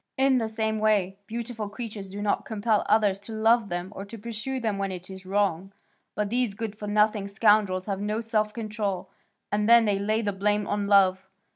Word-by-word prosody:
In 265 Hz, -1 st, +4 dB
the 225 Hz, -1 st, -2 dB
same 220 Hz, 0 st, -1 dB
way, 200 Hz, -3 st, +1 dB
beautiful 230 Hz, -2 st, -5 dB
creatures 210 Hz, -3 st, -7 dB
do 205 Hz, +2 st, -6 dB
not 205 Hz, -, 0 dB
compel 215 Hz, -1 st, 0 dB
others 205 Hz, -3 st, +3 dB
to 210 Hz, +3 st, -9 dB
love 225 Hz, 0 st, +3 dB
them 175 Hz, +3 st, -4 dB
or 195 Hz, -, -5 dB
pursue 230 Hz, +4 st, -5 dB
them 215 Hz, -4 st, -2 dB
when 195 Hz, -1 st, -1 dB
it 185 Hz, +1 st, -8 dB
is 190 Hz, 0 st, -10 dB
wrong, 195 Hz, -1 st, 0 dB, 0.4 s
but 210 Hz, -1 st, -1 dB
these 245 Hz, -4 st, 0 dB
good 220 Hz, -1 st, -4 dB
for 210 Hz, -1 st, -7 dB
nothing 210 Hz, -1 st, +2 dB
scoundrels 200 Hz, -2 st, +3 dB
have 200 Hz, -2 st, -3 dB
no 210 Hz, +1 st, -1 dB
self 215 Hz, -2 st, 0 dB
control, 210 Hz, -4 st, -4 dB, 0.4 s
and 210 Hz, +1 st, +1 dB
then 235 Hz, -1 st, +7 dB
they 200 Hz, -2 st, +1 dB
lay 215 Hz, +3 st, 0 dB
the 205 Hz, -1 st, -1 dB
blame 205 Hz, +1 st, +1 dB
on 205 Hz, 0 st, -1 dB
love. 190 Hz, -2 st, +4 dB
210 Hz, 195 wpm, -26 LUFS, 200-220 Hz, 0.4 s, then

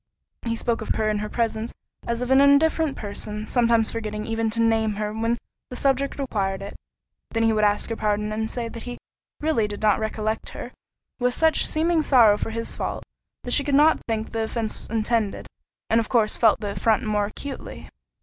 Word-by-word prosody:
He 230 Hz, -, 0 dB
spoke 230 Hz, 0 st, -1 dB
of -, -, -2 dB
her 215 Hz, -1 st, +1 dB
in 210 Hz, -, -1 dB
her 210 Hz, 0 st, -4 dB
presence 225 Hz, -1 st, -1 dB, 0.4 s
as 235 Hz, +1 st, -1 dB
of 250 Hz, -, -3 dB
an 265 Hz, +1 st, +6 dB
indifferent 285 Hz, +1 st, +4 dB
person, 210 Hz, 0 st, -5 dB
sometimes 230 Hz, -2 st, +2 dB
forgetting 215 Hz, -2 st, -4 dB
even 225 Hz, 0 st, -1 dB
to 230 Hz, +1 st, -2 dB
name 225 Hz, -1 st, +2 dB
her 210 Hz, 0 st, -3 dB
when 230 Hz, +2 st, 0 dB, 0.3 s
the 250 Hz, -, -7 dB
subject 275 Hz, +1 st, +1 dB
required 195 Hz, -8 st, -2 dB
it; 200 Hz, -, -8 dB, 0.5 s
then 225 Hz, 0 st, +2 dB
would 215 Hz, 0 st, +1 dB
ask 210 Hz, +2 st, +1 dB
her -, -, -1 dB
pardon, 210 Hz, 0 st, -1 dB
and 220 Hz, +1 st, -2 dB
say 235 Hz, -1 st, -4 dB
that 230 Hz, 0 st, -8 dB
he 245 Hz, +1 st, -7 dB, 0.4 s
"Really 295 Hz, -9 st, +1 dB
did 205 Hz, 0 st, -7 dB
not 210 Hz, -2 st, +4 dB
recollect 220 Hz, 0 st, -2 dB
her," -, -, -7 dB, 0.5 s
with 250 Hz, 0 st, +2 dB
such 320 Hz, -1 st, +3 dB
seeming 325 Hz, +1 st, +2 dB
sorrow 240 Hz, -8 st, +6 dB
for 210 Hz, -, -3 dB
his 230 Hz, +1 st, -4 dB
fault, -, -, -4 dB, 0.4 s
that 245 Hz, -, -5 dB
she 285 Hz, -, +5 dB
could 285 Hz, -1 st, +1 dB
not 300 Hz, +3 st, +5 dB
think 225 Hz, -1 st, -2 dB
the 225 Hz, -1 st, -1 dB
offence 220 Hz, -1 st, -4 dB
intended, 225 Hz, -1 st, -1 dB, 0.4 s
and 225 Hz, -, +3 dB
of 225 Hz, -, -2 dB
course 225 Hz, -4 st, +3 dB
felt 225 Hz, -3 st, +3 dB
the 205 Hz, -1 st, -3 dB
affront 220 Hz, +4 st, +1 dB
more 210 Hz, -2 st, 0 dB
acutely. 275 Hz, +6 st, -8 dB
225 Hz, 200 wpm, -24 LUFS, 215-245 Hz, 0.5 s, an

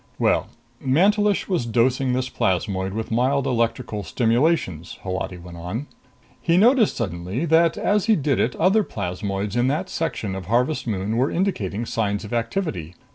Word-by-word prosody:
"Well, -, -, +2 dB, 0.4 s
Mantelish 200 Hz, +9 st, +3 dB
was 175 Hz, -11 st, -1 dB
dosing 125 Hz, +3 st, +2 dB
this 130 Hz, 0 st, 0 dB
plasmoid 95 Hz, -3 st, -1 dB
with 110 Hz, +1 st, -4 dB
mild 130 Hz, +4 st, +2 dB
electrical 115 Hz, -3 st, -1 dB
stimulations," 115 Hz, -, 0 dB
Holati 95 Hz, -1 st, -3 dB
went 85 Hz, 0 st, -11 dB
on. 90 Hz, +11 st, -4 dB, 0.6 s
"He 170 Hz, 0 st, +2 dB
noticed 230 Hz, +2 st, +4 dB
suddenly 95 Hz, -, -3 dB
that 165 Hz, 0 st, +3 dB
as 205 Hz, -1 st, +1 dB
he 220 Hz, 0 st, +4 dB
did 145 Hz, -5 st, 0 dB
it 120 Hz, -, +1 dB
other 205 Hz, +4 st, +3 dB
plasmoids 100 Hz, -, -3 dB
in 120 Hz, +1 st, +2 dB
that 145 Hz, +4 st, -1 dB
section 120 Hz, -11 st, -2 dB
of 95 Hz, -2 st, -6 dB
Harvest 125 Hz, +4 st, +1 dB
Moon 105 Hz, +1 st, -1 dB
were 130 Hz, +4 st, +2 dB
indicating 120 Hz, -, -1 dB
signs 100 Hz, -3 st, -1 dB
of 105 Hz, -, -7 dB
activity. 115 Hz, -, -2 dB
120 Hz, 155 wpm, -23 LUFS, 100-155 Hz, 0.6 s, noticed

